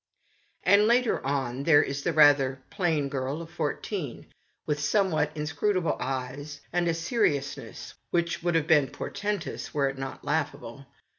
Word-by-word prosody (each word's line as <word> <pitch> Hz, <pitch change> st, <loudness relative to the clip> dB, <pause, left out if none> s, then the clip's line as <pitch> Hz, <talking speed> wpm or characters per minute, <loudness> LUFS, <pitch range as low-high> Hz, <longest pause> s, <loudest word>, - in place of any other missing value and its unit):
And, 205 Hz, +1 st, +5 dB
later 240 Hz, 0 st, +2 dB
on, 135 Hz, -2 st, -1 dB
there 145 Hz, 0 st, +5 dB
is 140 Hz, +1 st, -3 dB
the 175 Hz, -, 0 dB
rather 145 Hz, -4 st, +5 dB
plain 170 Hz, -8 st, 0 dB
girl 135 Hz, +2 st, -3 dB
of 165 Hz, -1 st, -9 dB
fourteen, 150 Hz, -, -4 dB, 0.4 s
with 150 Hz, -1 st, -1 dB
somewhat 155 Hz, -1 st, +2 dB
inscrutable 165 Hz, +4 st, 0 dB
eyes, 135 Hz, +3 st, -4 dB
and 175 Hz, 0 st, +1 dB
a 165 Hz, -, +2 dB
seriousness 165 Hz, -, -2 dB, 0.2 s
which 170 Hz, -1 st, 0 dB
would 175 Hz, 0 st, 0 dB
have 160 Hz, -2 st, +2 dB
been 150 Hz, -4 st, +4 dB
portentous 205 Hz, -2 st, -4 dB
were 140 Hz, -2 st, +2 dB
it 135 Hz, 0 st, -7 dB
not 135 Hz, 0 st, -6 dB
laughable. 140 Hz, -4 st, -3 dB
150 Hz, 145 wpm, -27 LUFS, 140-175 Hz, 0.4 s, And